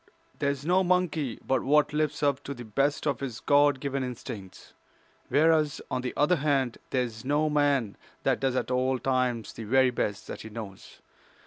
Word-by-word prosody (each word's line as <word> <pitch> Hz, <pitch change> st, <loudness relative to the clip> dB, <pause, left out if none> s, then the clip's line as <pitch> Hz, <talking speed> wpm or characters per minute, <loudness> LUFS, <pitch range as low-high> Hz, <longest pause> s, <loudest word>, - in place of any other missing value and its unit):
There 140 Hz, -, +1 dB
is 140 Hz, 0 st, -3 dB
no 185 Hz, +3 st, +3 dB
monkey 175 Hz, -8 st, 0 dB
but 130 Hz, -, +1 dB
what 150 Hz, +1 st, +3 dB
lives 150 Hz, -1 st, -1 dB
up 140 Hz, -1 st, +1 dB
to 140 Hz, -, -5 dB
the 120 Hz, -1 st, -9 dB
best 140 Hz, +8 st, 0 dB
of 140 Hz, -5 st, 0 dB
his 130 Hz, -5 st, -5 dB
God 145 Hz, -1 st, +4 dB
given 140 Hz, -1 st, -2 dB
instincts, 110 Hz, -6 st, -8 dB, 0.6 s
whereas, 155 Hz, -1 st, +3 dB
on 130 Hz, -, -1 dB
the 125 Hz, -, -4 dB
other 150 Hz, +5 st, +3 dB
hand, 140 Hz, -4 st, 0 dB
there 130 Hz, -1 st, +1 dB
is 115 Hz, -2 st, -7 dB
no 150 Hz, +3 st, +1 dB
man 140 Hz, -7 st, +1 dB, 0.3 s
that -, -, +2 dB
does 135 Hz, -1 st, 0 dB
at 130 Hz, -, -1 dB
all 130 Hz, +1 st, +1 dB
times 125 Hz, -3 st, -1 dB
the 115 Hz, -, -7 dB
very 130 Hz, +3 st, +4 dB
best 105 Hz, -3 st, -2 dB
that -, -, -7 dB
he 110 Hz, -, -8 dB
knows. 105 Hz, -3 st, -9 dB
135 Hz, 190 wpm, -28 LUFS, 125-145 Hz, 0.6 s, God